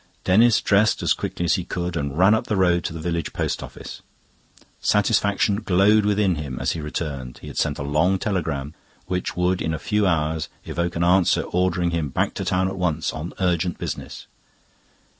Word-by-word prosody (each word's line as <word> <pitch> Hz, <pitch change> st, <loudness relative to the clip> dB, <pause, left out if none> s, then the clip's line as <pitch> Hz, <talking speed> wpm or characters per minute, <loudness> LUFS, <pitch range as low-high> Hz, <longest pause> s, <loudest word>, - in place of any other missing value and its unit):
Denis 110 Hz, +5 st, +4 dB
dressed 105 Hz, +1 st, +2 dB
as -, -, +3 dB
quickly 85 Hz, -, -4 dB
as 85 Hz, -, +3 dB
he 90 Hz, -, 0 dB
could 90 Hz, 0 st, -4 dB
and 70 Hz, -2 st, -3 dB
ran 95 Hz, +4 st, +6 dB
up 110 Hz, -, 0 dB
the 105 Hz, -, 0 dB
road 90 Hz, -3 st, +2 dB
to -, -, -3 dB
the 80 Hz, -, -6 dB
village 85 Hz, -1 st, -3 dB
post -, -, -2 dB
office. -, -, -9 dB, 0.8 s
Satisfaction 100 Hz, -1 st, +2 dB
glowed 105 Hz, +1 st, +3 dB
within 100 Hz, -4 st, +2 dB
him 70 Hz, -4 st, -5 dB
as -, -, 0 dB
he 80 Hz, -, -4 dB
returned. 70 Hz, -5 st, -5 dB
He -, -, -13 dB
had -, -, -9 dB
sent 70 Hz, -, 0 dB
a -, -, -4 dB
long 80 Hz, +7 st, +2 dB
telegram, 80 Hz, -8 st, -2 dB, 0.3 s
which 90 Hz, -1 st, -3 dB
would 90 Hz, +1 st, +1 dB
in 80 Hz, 0 st, -1 dB
a -, -, -3 dB
few 105 Hz, +4 st, 0 dB
hours 80 Hz, -2 st, 0 dB, 0.2 s
evoke 85 Hz, 0 st, -2 dB
an 85 Hz, -, 0 dB
answer 90 Hz, 0 st, +4 dB
ordering 90 Hz, -1 st, 0 dB
him 80 Hz, -4 st, -1 dB
back -, -, -1 dB
to -, -, -4 dB
town 95 Hz, +1 st, +1 dB
at 95 Hz, 0 st, -5 dB
once 90 Hz, -4 st, -1 dB
on 80 Hz, +3 st, -5 dB
urgent 90 Hz, -1 st, 0 dB
business. -, -, -6 dB
90 Hz, 195 wpm, -23 LUFS, 80-95 Hz, 0.8 s, ran